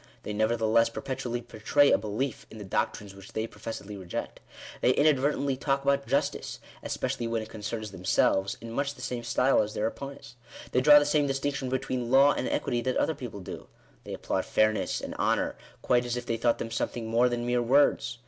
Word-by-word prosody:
They 105 - -4
nevertheless 110 +1 +2
perpetually 120 0 -4
betray 125 +5 +2
a - - +5
belief 110 +5 -3
in - - -11
the 105 - -7
doctrines 100 +1 -2
which 100 0 -13
they 110 - -1
professedly 105 -2 -7
reject. 90 -3 -6 0.4
They 125 - +4
inadvertently 140 -1 +2
talk 135 0 0
about 140 0 +1
Justice, - - -1 0.2
especially 120 - -3
when 115 -1 -1
it 110 - -11
concerns 110 -1 -5
themselves, 95 +1 +1
in 115 0 -8
much 140 +3 -2
the 125 - -12
same 125 -2 -3
style 125 +3 +3
as 105 0 -4
their 105 - 0
opponents. 135 +1 -7 0.3
They 125 - +2
draw 145 +2 +8
the 145 - +4
same 145 0 +2
distinction 135 -1 -2
between 130 -2 -2
law 135 +3 +6
and 130 - -2
equity 120 -1 -1
that 130 +1 -1
other 160 - +1
people 120 -8 -8
do. 90 - -8 0.4
They - - -6
applaud - - -2
fairness, 110 0 +1
and - - -6
honour, - - +1 0.3
quite 125 -1 +3
as 120 0 -3
if 120 - -5
they 115 - -1
thought 115 0 +2
them 115 - -5
something 115 0 -2
more 115 +2 +3
than 120 0 -2
mere 120 0 +1
words. 130 0 +3
120 Hz, 195 wpm, -28 LUFS, 110-135 Hz, 0.4 s, draw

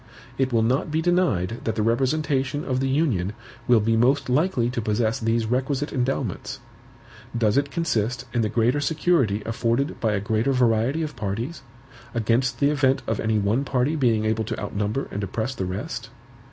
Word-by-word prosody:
It 130 -1 +1
will 115 -2 +3
not 125 +6 +1
be 155 +1 0
denied 160 - +1
that 110 - -1
the 110 - 0
representation 135 +3 0
of 130 -2 0
the 135 0 0
Union 125 - +1 0.3
will 120 -2 +6
be 115 +2 +1
most 130 +4 +2
likely 130 -2 +2
to 125 -1 -2
possess 110 +1 0
these 115 0 +1
requisite 135 +5 -1
endowments. 130 -5 -2 0.8
Does 110 -2 +2
it 140 +1 +2
consist 130 -8 -1
in 120 - +1
the 110 - 0
greater 120 +5 +2
security 140 - +1
afforded 115 +4 -1
by 110 -2 +1
a 100 - +1
greater 110 +6 0
variety 125 +5 +2
of 155 - -5
parties, 115 +10 -4 0.5
against 120 +3 +1
the 140 0 +3
event 135 -2 +2
of 110 -2 -1
any 110 0 +1
one 105 +6 +1
party 135 +2 0
being 115 -7 +2
able 110 0 +1
to - - -4
outnumber 105 +5 -2
and 100 - -3
oppress 110 +6 -2
the 95 - -3
rest? 120 - -5
120 Hz, 180 wpm, -24 LUFS, 110-140 Hz, 0.8 s, will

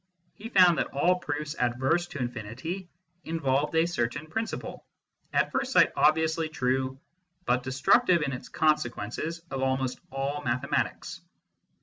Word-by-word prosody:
He 225 +2 -9
found 180 -6 +6
that - - 0
all 180 +6 +2
proofs 150 -2 -3
adverse 130 +8 +1
to - - -8
infinity 125 - -5 0.3
involved 150 -2 0
a 160 +1 +4
certain 145 -3 -2
principle, 220 +8 -4 0.5
at - - +1
first 265 0 -1
sight - - +6
obviously 160 +1 +2
true, 130 -2 -1 0.5
but 125 +1 +2
destructive, 150 - +3
in 140 -2 -2
its 130 - -7
consequences, 155 +1 -1
of 135 0 -3
almost 130 -1 0
all 135 +2 -3
mathematics. 130 +2 -2
145 Hz, 130 wpm, -28 LUFS, 130-165 Hz, 0.5 s, found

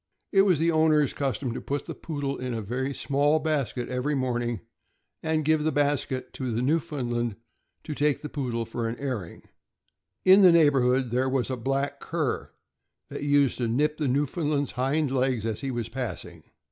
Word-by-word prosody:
It 195 - +6
was 190 -4 +4
the 165 +3 +2
owner's 155 -3 +3
custom 135 -3 -2
to - - -5
put 145 +1 -3
the - - -5
Poodle 145 -3 -4
in 125 -1 -3
a 125 +6 -2
small 145 +2 +2
basket 145 -5 -1
every 130 +4 -1
morning, 120 -5 -1 0.6
and 160 -1 0
give 155 0 +3
the 155 - +1
basket 140 -2 -1
to 130 -2 -4
the 115 +2 -1
Newfoundland 125 -6 -1 0.5
to 155 - -5
take 145 -1 +1
the - - -3
Poodle 125 -6 -3
for 115 +1 -3
an 115 - -5
airing. 125 -11 -5 0.8
In 190 +2 +8
the 185 -2 +8
neighborhood 135 -6 +3
there 130 +2 +1
was 130 -1 0
a - - 0
black 135 +3 -2
cur - - -2 0.6
that - - -6
used 145 -2 +2
to 120 - 0
nip 150 +6 +1
the 150 - 0
Newfoundland' 145 +2 0
s - - -5
hind 135 +3 0
legs 130 -4 0
as 110 -2 -2
he 135 - -3
was 120 -3 -3
passing. 125 0 -6
135 Hz, 180 wpm, -27 LUFS, 125-150 Hz, 0.8 s, In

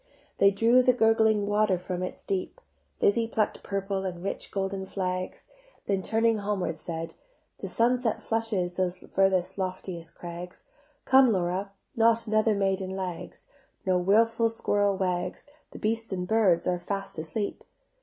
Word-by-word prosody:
They 200 - +7
drew 230 +5 +4
the 255 0 +4
gurgling 220 -3 +3
water 205 -2 +2
from 180 0 -4
its 185 - -6
deep; 190 -2 -3 0.4
Lizzie 225 +3 +3
pluck'd 220 -2 -1
purple 195 -1 -2
and 180 -2 -5
rich 195 - -3
golden 195 -1 -3
flags, 185 -1 -3 0.4
Then 195 -1 0
turning 225 +2 +2
homeward 200 -5 -2
said: 165 0 -5 0.5
"The - - -5
sunset 240 0 +1
flushes 215 -6 -1
Those 185 -1 0
furthest 190 0 0
loftiest 185 -3 -5
crags; 175 +1 -8 0.4
Come, 265 -2 +6
Laura, 190 +1 -1 0.2
not 230 0 +3
another 215 0 +2
maiden 195 -1 0
lags. 185 -3 -6 0.4
No 185 -1 +3
wilful 225 +5 +3
squirrel 205 -3 +1
wags, 180 -1 -2 0.2
The - - -11
beasts 225 +1 -2
and 180 -1 -3
birds 190 -6 +3
are 180 -1 +1
fast 195 -1 -4
asleep." 200 +6 -4
195 Hz, 145 wpm, -27 LUFS, 185-220 Hz, 0.5 s, They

